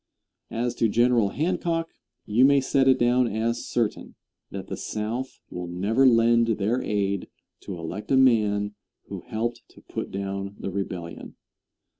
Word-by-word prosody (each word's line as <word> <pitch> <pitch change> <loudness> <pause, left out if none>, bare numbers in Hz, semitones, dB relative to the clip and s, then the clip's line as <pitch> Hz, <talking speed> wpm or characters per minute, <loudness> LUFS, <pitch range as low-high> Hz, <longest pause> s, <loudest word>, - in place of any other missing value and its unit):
As 120 +1 -1
to 115 - +2
General 120 -2 +3
Hancock, 165 - -1 0.4
you 110 +4 +3
may 140 +1 +6
set 135 0 +2
it 130 -1 +6
down 120 0 +3
as 115 +2 -2
certain 115 -3 -2 0.3
that - - -6
the - - -5
South 115 +5 -4
will 90 0 -5
never 105 +10 +2
lend 115 -1 +4
their 110 +5 0
aid 100 -2 -1 0.3
to 95 - -7
elect 90 +6 -6
a 135 - +4
man 105 -5 +3 0.4
who - - -6
helped 115 +2 -3
to - - -18
put - - -5
down 100 0 -4
the 95 - -5
Rebellion. 90 -3 -5
115 Hz, 150 wpm, -25 LUFS, 100-125 Hz, 0.4 s, may